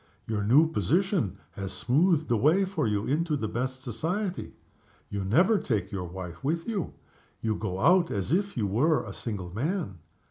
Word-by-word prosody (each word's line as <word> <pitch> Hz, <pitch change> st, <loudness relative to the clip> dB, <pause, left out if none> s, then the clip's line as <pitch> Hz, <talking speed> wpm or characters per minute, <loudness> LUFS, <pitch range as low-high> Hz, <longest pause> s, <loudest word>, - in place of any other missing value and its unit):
Your 105 Hz, -2 st, -2 dB
new 135 Hz, +10 st, +5 dB
position 170 Hz, -, 0 dB
has 95 Hz, -1 st, -5 dB
smoothed 150 Hz, -, +2 dB
the 120 Hz, -, +2 dB
way 155 Hz, -, +4 dB
for 175 Hz, -, -1 dB
you 105 Hz, -1 st, 0 dB
into 155 Hz, +2 st, 0 dB
the 110 Hz, -, -2 dB
best 130 Hz, +4 st, -3 dB
society. 175 Hz, -, -3 dB, 0.6 s
You 100 Hz, -1 st, -2 dB
never 175 Hz, -, +4 dB
take 105 Hz, -5 st, -1 dB
your 95 Hz, -3 st, -3 dB
wife 90 Hz, -1 st, -8 dB
with 165 Hz, +4 st, -1 dB
you. 210 Hz, -7 st, -3 dB, 0.5 s
You 110 Hz, -1 st, 0 dB
go 95 Hz, -4 st, -3 dB
out 175 Hz, -, +4 dB
as 100 Hz, +4 st, -2 dB
if 200 Hz, +1 st, 0 dB
you 110 Hz, -, +1 dB
were 135 Hz, +11 st, +2 dB
a -, -, -7 dB
single 95 Hz, -6 st, -5 dB
man. 145 Hz, -, -2 dB
130 Hz, 175 wpm, -28 LUFS, 100-170 Hz, 0.6 s, new